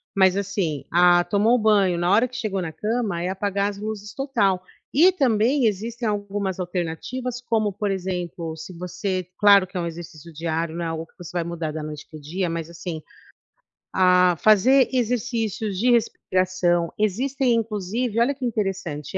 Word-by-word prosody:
mas 190 -1 +4
assim, 195 -7 -2
ah, 175 0 +5
tomou 215 +6 +3
banho, 205 -5 +3
na 175 +1 +1
hora 225 +5 +4
que 255 - -13
chegou 215 -6 -2
na 165 -3 -4
cama, 210 -1 -2
é 180 - -1
apagar 200 +1 -1
as 200 - -7
luzes 210 0 -6
total. 215 -9 0 0.3
E 340 +7 +6
também 255 - +2
existem 225 +3 -1
algumas 205 -2 -3
alternativas, 185 +8 -4
como 220 -4 0
por 205 +1 -2
exemplo, 175 -3 -4
se 160 +3 -9
você 185 +1 -3
claro 200 -2 +6
que 180 - -7
é - - 0
um 170 - -2
exercício 165 -1 -9
diário, 160 +1 -2
não 170 - -3
é - - -1
algo 165 0 -4
que - - -31
você 175 -3 -9
vai 175 -1 -1
mudar 165 -2 -4
da 155 0 -5
noite 150 -1 -7
para 155 - -10
o - - -13
dia, 175 +5 -2
mas 165 -1 -4
assim, 170 -1 -6 0.9
ah, 180 -1 +4
fazer 235 +8 +5
exercícios 230 -4 -1
de 245 +6 +3
respiração. 185 -6 +1
Existem, 250 +5 +1
inclusive 220 +1 -2
olha 260 +4 +3
que 265 -2 -5
interessante, 195 - -3
195 Hz, 175 wpm, -23 LUFS, 175-220 Hz, 0.9 s, E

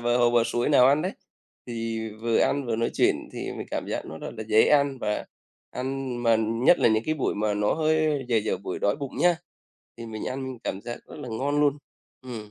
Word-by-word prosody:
bờ 120 0 +2
hồ 120 -1 +4
bờ 120 -1 +4
suối 120 +1 0
nào 140 -4 +6
ăn 145 +3 +4
đấy 185 +3 -2 0.5
thì 115 -2 -3
vừa 115 -1 +2
ăn 140 -1 +1
vừa 115 -1 -1
nói 115 +1 0
chuyện - - +1
thì - - -5
mình - - -6
cảm - - -3
giác - - -3
nó 80 - -8
rất - - -6
là 110 - -5
dễ 110 +1 +6
ăn 140 -2 +3
và 105 -2 -2 0.4
ăn 130 0 -3
mà 115 -1 +4
nhất 115 +9 +3
là - - +4
những 110 0 +2
cái 155 - 0
buổi 140 - -1
mà 105 0 0
nó 105 0 +1
hơi 155 -2 +1
dở 115 - +2
dở 110 0 0
buổi 95 -1 -5
đói 100 - +1
bụng 140 -3 -6
nhá, 175 -1 +4 0.6
thì 115 -1 -8
mình 110 -1 -6 0.4
cảm 95 - -3
giác 120 - -5
rất - - -11
là 130 -4 -7
ngon 140 +6 0
luôn. 145 -1 +2 0.4
Ừm. 115 -5 -8
120 Hz, 230 wpm, -26 LUFS, 110-140 Hz, 0.6 s, nào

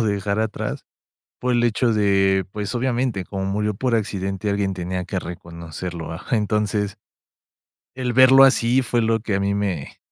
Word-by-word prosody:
como - - +3
dejar 100 0 0
atrás 110 -1 -3 0.5
por 125 0 0
el 120 0 +2
hecho 120 0 +2
de, 95 -2 +3
pues, 105 +3 -4
obviamente, 120 -5 -1
como 95 0 -4
murió 105 +2 -1
por 125 +3 0
accidente, 100 -2 -2
alguien 100 -1 0
tenía 90 0 -3
que 95 0 -3
reconocerlo, 85 -1 -7 0.2
entonces 105 -1 0 1.0
el 125 -2 -2
verlo 130 +1 +8
así, 130 -1 +4
fue 120 -2 0
lo 115 0 +1
que 105 -3 -2
a 100 - +1
mí 100 0 0
me 95 -8 -3
105 Hz, 160 wpm, -22 LUFS, 95-115 Hz, 1.0 s, verlo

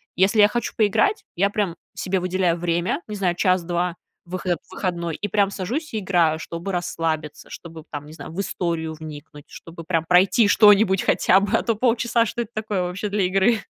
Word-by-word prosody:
Если 200 +4 +3
я 205 - +8
хочу 235 +2 -3
поиграть, 225 - +2
я 200 +3 +2
прям 200 -5 -2 0.2
себе 190 -1 -2
выделяю 180 -2 +1
время, 175 - -1
не 210 - -4
знаю, 180 -3 0
час, 185 0 +2
2, 175 0 -1 0.3
выход 175 -1 -2
в - - -27
выходной, 170 -4 -2
и 205 - -3
прям 200 0 +1
сажусь 235 - -4
и 215 - -1
играю, 170 -5 +1
чтобы 170 +4 -6
расслабиться, 165 -4 -3
чтобы, 165 -2 -10
б - - -23
там, 145 -1 -6
не 155 - -12
знаю, 160 - -9
в 180 - -7
историю 170 -4 -2
вникнуть, 150 -1 -10
чтобы 165 0 -11
прям 165 -1 -1
пройти 190 +6 +4
что-нибудь 205 -2 +5
хотя 190 - +3
бы, 200 0 +1
а - - -3
то 230 - 0
полчаса, 235 0 +1
что 235 +1 -3
это 225 - -15
такое 210 -4 -2
вообще 185 +4 -4
для 200 -1 0
игры. 195 +4 +2
185 Hz, 200 wpm, -22 LUFS, 170-205 Hz, 0.3 s, я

